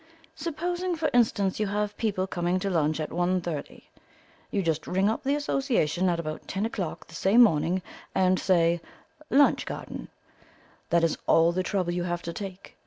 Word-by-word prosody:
Supposing, 350 +3 -2
for 320 -1 -1
instance, 210 -5 +2
you 210 - +1
have 205 +1 -1
people 205 -5 -1
coming 175 -1 -1
to 195 - -1
lunch 155 -2 +1
at 155 - -4
one 180 +1 +1
thirty; 165 -4 -6 0.6
you 200 - -1
just 160 -2 -1
ring 190 +2 +2
up 220 - 0
the 275 +2 +1
Association 240 - +1
at 170 -1 0
about 155 -2 -5
ten 195 +2 -2
o'clock 195 -7 -4
the - - -17
same 205 +8 +5
morning, 180 -1 +2 0.3
and 185 0 +3
say 170 -2 +2 0.5
'lunch 285 +1 +4
garden'. - - -6 0.8
That 170 0 +3
is 165 - +1
all 165 +1 +5
the 185 +2 0
trouble 185 -2 -1
you 175 - -1
have 175 -1 -3
to 170 - -4
take. 195 0 -8
185 Hz, 175 wpm, -27 LUFS, 170-215 Hz, 0.8 s, same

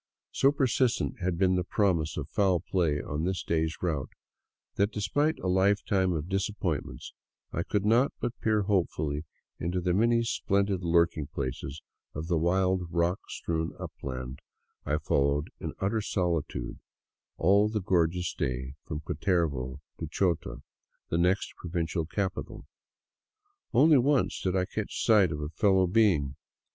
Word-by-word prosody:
So 135 - +4
per 140 -2 +1
sistent 125 -2 +1
had 90 -1 0
been 95 0 +3
the 90 -1 +1
promise 85 -5 +1
of - - -3
foul 95 -4 +2
play 85 -4 0
on 75 +2 -3
this 95 +1 -1
day's 80 0 0
route 75 -7 -1 0.6
that, 100 +1 +2
de 105 - -5
J - - -2
spite 145 - +1
a^fetime 95 -1 +2
of 75 +2 -5
disappointments, 95 - -3 0.4
I - - 0
could 105 -1 -1
not 120 +5 +4
but 120 - -2
peer 110 -2 +2
hopefully 80 -6 0 0.3
into 90 +2 -1
the 90 0 0
many 115 +4 +3
splendid 100 -4 0
lurking 85 -3 +2
places 70 0 -5 0.3
of 75 +2 -4
the 85 -1 +1
wild, 90 +1 +1
rock 85 +2 +1
strewn 80 -1 -2
upland 65 0 -6 0.5
I 75 - +2
followed 70 0 +1
in - - -5
utter 105 +3 0
solitude 85 - -2 0.6
all 100 +5 +4
the 110 0 -1
gorgeous 90 -2 +1
day 65 0 -3
from 75 - -4
Cutervo 70 -7 -1 0.2
to - - -4
Chota, 90 -5 -1 0.2
| - - -48
the 85 - +1
next 90 +3 +1
provincial 85 -1 -2
capital. 95 +2 -3 1.1
Only 150 +2 +6
once 140 +1 +1
did 95 0 0
I 90 -1 +2
catch 105 +2 -4
sight 105 -7 +5
of 75 +1 -4
fellow 95 -2 +4
J 90 - -4
beings. 90 -12 +3
90 Hz, 150 wpm, -29 LUFS, 80-100 Hz, 1.1 s, Only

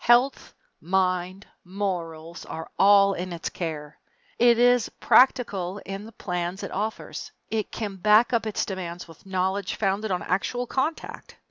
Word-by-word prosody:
Health, 245 +3 +3 0.3
mind, 185 +1 0 0.2
morals, 175 -4 -4 0.4
all 200 0 +6
are - - -6
in 185 +1 -4
its 170 -1 -4
care. 150 -3 -6 0.4
It 240 -1 +6
is 245 -1 +4
practical 200 -8 +3
in 195 +2 -6
the 225 - -11
plans 180 -2 -4
it - - -5
offers. 215 +3 -4 0.2
It 220 -2 -2
can 205 -3 -5
back 215 +6 +4
up 230 -1 +1
its 215 - -1
demands 180 -3 -6
with 165 +3 -16
knowledge 190 +1 -1
founded 205 +1 -1
on 180 -2 -1
actual 245 +7 -1
contact. 270 +6 -3
195 Hz, 145 wpm, -25 LUFS, 180-220 Hz, 0.4 s, all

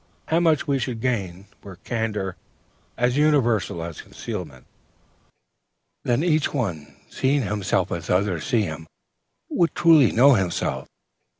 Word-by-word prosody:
How 165 - +3
much 160 -4 +2
we 140 -1 +1
should 120 -2 -3
gain, 100 -7 -2 0.2
were 100 -2 -10
candor 105 -3 -3 0.6
as 125 +2 +1
universal 120 - +2
as 85 -2 -7
concealment! 70 -8 -8 1.4
Then 120 +5 +1
each 155 -4 +1
one, 90 - -4
seeing 135 +1 0
himself 105 -3 -1
as 85 -1 -5
others 90 -3 +1
see 115 -3 +1
him, 80 -3 -6 0.6
would 170 -1 +1
truly 160 -7 +5
know 135 +5 +6
himself. 95 -7 -1
115 Hz, 125 wpm, -23 LUFS, 90-140 Hz, 1.4 s, know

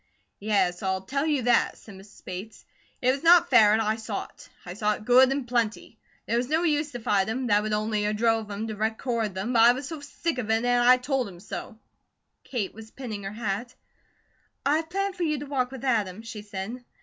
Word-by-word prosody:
"Yes, 200 -4 +1
I'll 190 -1 -1
tell 275 +8 -1
you 290 -5 +1
that," 240 0 +2
said 215 - -13
Mrs. 195 +1 -16
Bates. 185 +4 -8 0.4
"It 255 - +5
was 270 +1 -3
not 340 +1 +6
fair, 210 -1 +7
and 215 - +3
I 220 0 0
saw 220 -2 -4
it; - - -17 0.2
I 175 - -6
saw 210 +2 0
it 210 - -9
good 255 +2 +6
and 270 -2 -2
plenty. 235 -3 -2 0.3
There 235 - 0
was 245 +2 -1
no 320 +3 +2
use 300 -2 +1
to 245 - -5
fight 200 -4 +1
him; 255 +3 -2
that 205 -3 +3
would 215 0 -3
only 210 0 0
a 210 - +1
drove 225 0 +1
him 205 +2 -4
to 220 -1 -5
record 220 -1 -2
them, 205 +7 -2
but 230 - +5
I 235 +2 +8
was 260 +2 -6
sick 300 0 -3
of 220 -3 -4
it, 225 +2 +2
an' 245 0 +3
I 255 0 +8
told 255 -1 -1
him 175 -2 -13
so." 215 +3 -7 0.7
Kate 230 -7 -3
was 220 +1 -11
pinning 220 -5 -7
her 195 - -5
hat. 230 +3 -4 0.9
"I 290 +2 +3
have 320 0 -4
planned 395 +1 -2
for - - -6
you 305 -3 +1
to 285 - -6
walk 265 -3 -1
with 265 0 -8
Adam," 215 -5 0
she 225 -2 -7
said. 205 +4 -6
230 Hz, 230 wpm, -26 LUFS, 210-260 Hz, 0.9 s, I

